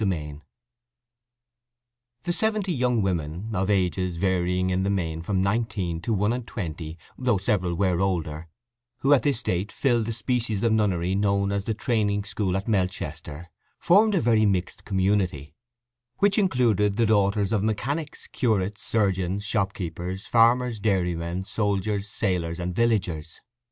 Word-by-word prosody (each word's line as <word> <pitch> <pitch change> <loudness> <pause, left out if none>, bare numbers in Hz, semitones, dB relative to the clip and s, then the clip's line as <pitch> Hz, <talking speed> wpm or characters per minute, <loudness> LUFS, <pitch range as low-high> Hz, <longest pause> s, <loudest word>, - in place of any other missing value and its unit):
III 75 -6 -3 1.8
The 175 - -1
seventy 215 -2 0
young 125 -5 +1
women, 90 +4 -3
of 95 +1 0
ages 90 -2 0
varying 90 0 +1
in 90 +1 +1
the 95 - 0
main 80 -5 -1
from 95 +2 0
nineteen 100 -5 -1
to 115 - -3
one 105 +1 +1
and 125 -1 -5
twenty, 80 -4 -5 0.2
though 125 -5 +2
several 95 -3 0
were 90 -1 +1
older, 85 -4 -2 0.5
who 140 +2 +5
at 135 - +5
this 130 -2 0
date 90 +4 -1
filled 120 -5 +1
the - - -1
species 115 -2 -1
of 115 - +3
nunnery 95 -5 +1
known 100 0 +1
as 100 -1 -2
the 110 - -1
Training 105 -3 0
School 100 -2 -1
at 95 - -5
Melchester, 85 -6 -2 0.3
formed 205 +4 +4
a - - +2
very 110 -2 +3
mixed 95 -3 -2
community, 95 -7 0 0.6
which 200 +1 +3
included 115 - +2
the 115 - +3
daughters 100 -2 +2
of 110 -3 +1
mechanics, 140 +8 -2
curates, 105 -5 -1
surgeons, 100 -2 0
shopkeepers, 95 -2 -3
farmers, 120 0 +3
dairy 95 -4 +1
men, 85 +2 -4
soldiers, 100 0 -1
sailors, 90 -5 -1
and 90 +1 -3
villagers. 90 -8 0
100 Hz, 145 wpm, -25 LUFS, 90-115 Hz, 1.8 s, who